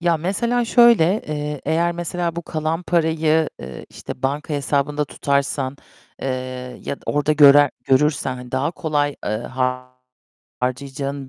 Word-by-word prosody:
Ya, 170 -1 +2
mesela 235 +9 0
şöyle, 235 -6 +6 0.2
eee, 150 -1 -4
eğer 170 +2 +1
mesela 175 0 -3
bu 170 - -3
kalan 160 +1 -2
parayı, 160 -2 +2
eee, 65 0 -9
işte, - - -9
banka 145 +3 -2
hesabında 145 +1 0
tutarsan, 140 -1 -1 0.5
eee, 135 - -1 0.6
ya - - -3
da - - -25
orada 145 +1 +1
görer 145 -1 +7
görürsen, 135 0 +2
hani, 125 0 -11
daha 130 +4 0
kolay, 145 -4 -1
eee, - - -2 1.3
harcayacağın 135 +2 -3
150 Hz, 135 wpm, -21 LUFS, 140-165 Hz, 1.3 s, görer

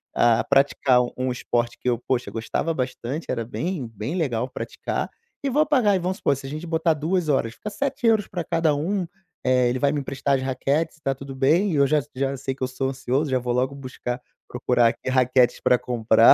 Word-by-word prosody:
a 120 -1 +4
praticar 135 -2 +3
u 120 - -5
um 130 0 0
esporte 120 -1 -1
que - - -6
eu, 120 - +1
poxa, 125 0 -2
gostava 115 +8 -2
bastante, 130 +2 -3
era 115 - -1
bem 155 +3 -3
bem 115 - -5
legal 130 -8 -1
praticar - - -3 0.4
e 280 - +1
vou 300 +4 +3
pagar 255 -8 +4
aí 195 - +3
vamos 185 +2 -2
supor, 140 - +1
se 135 +1 -9
a - - -6
gente 155 +4 -5
botar 165 0 +2
2 160 +2 0
horas, 125 -5 +1
fica 210 - -6
€7 225 -4 +1
pra 175 -2 -4
cada 160 -2 +1
um, 185 +7 -1 0.4
eh, 125 -1 +3
ele 125 - 0
vai 140 0 +3
me 150 - -1
emprestar 135 +1 0
as - - -4
raquetes 140 +5 0
e - - -29
tá 135 -2 0
tudo 135 0 -8
bem, 160 +10 +3
e - - 0
eu 140 -1 +5
já 150 +1 +3
já 135 +1 -1
sei 135 0 -3
que 135 - -5
eu - - +1
sou 130 +1 -2
ansioso, 135 +2 -1
já 130 - +3
vou 120 0 -2
logo 130 +3 0
buscar 130 -2 -5 0.3
procurar 125 -1 +2
aqui 120 - -5
raquetes 130 -1 +3
pra 125 - +4
comprar, 115 -2 +5
135 Hz, 225 wpm, -24 LUFS, 125-160 Hz, 0.4 s, eu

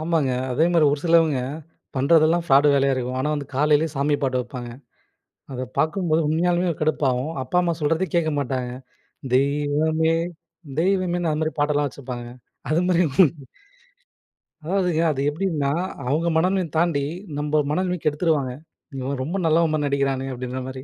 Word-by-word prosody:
ஆமாங்க. 155 -4 +1 0.2
அதே 155 +6 +2
மாரி 165 -3 +4
ஒரு 145 - -2
சிலவங்க 165 -5 +4 0.6
பண்றதெல்லாம் 160 +4 +3
ஃப்ராடு 140 +1 +5
வேலையா 135 -1 +3
இருக்கும். 125 0 -3
ஆனா 150 +3 0
வந்து 145 -1 -4
காலையிளே 150 +2 +3
சாமி 145 +2 +1
பாட்டு 130 -2 0
வப்பாங்க. 125 -1 -7 0.8
அதப் 130 0 -6
பார்க்கும்போது 165 -1 +1
உண்மையாலுமே 175 +3 +1
ஒரு - - -12
கடுப்பாவும். 145 -2 0
அப்பா 130 +7 -3
அம்மா 175 -1 0
சொல்றத 165 +5 +1
கேட்கமாட்டாங்க. 140 -6 -1 0.7
"தெய்வமே 150 +4 +1 0.7
தெய்வமேன்னு" 175 -2 +1
அந்த 150 - -1
மாரி 155 - -2
பாட்டெல்லாம் 145 0 +1
வச்சிருப்பாங்கங்க. 125 -3 -8 0.4
அது 160 +3 +2
மாரி 180 -1 +3 1.6
அதாதுங்க 180 -3 +1
அது 135 -2 -3
எப்டின்னா, 150 -4 -1 0.4
அவங்க 160 +5 +1
மனநிலை 185 +1 +1
தாண்டி 160 -4 +1 0.3
நம்ம 150 +1 +1
மனநிலமைக் 180 0 -1
கெடுத்துருவாங்க. 150 -3 +1 0.5
இவன் 130 +1 -3
ரொம்ப 170 +8 -3
நல்லவன் 160 0 +3
மாரி 150 -1 0
நடிக்கிறானே 135 -1 0
அப்டின்ற 125 +1 -5
மாரி. 130 0 -7
150 Hz, 140 wpm, -23 LUFS, 135-165 Hz, 1.6 s, ஃப்ராடு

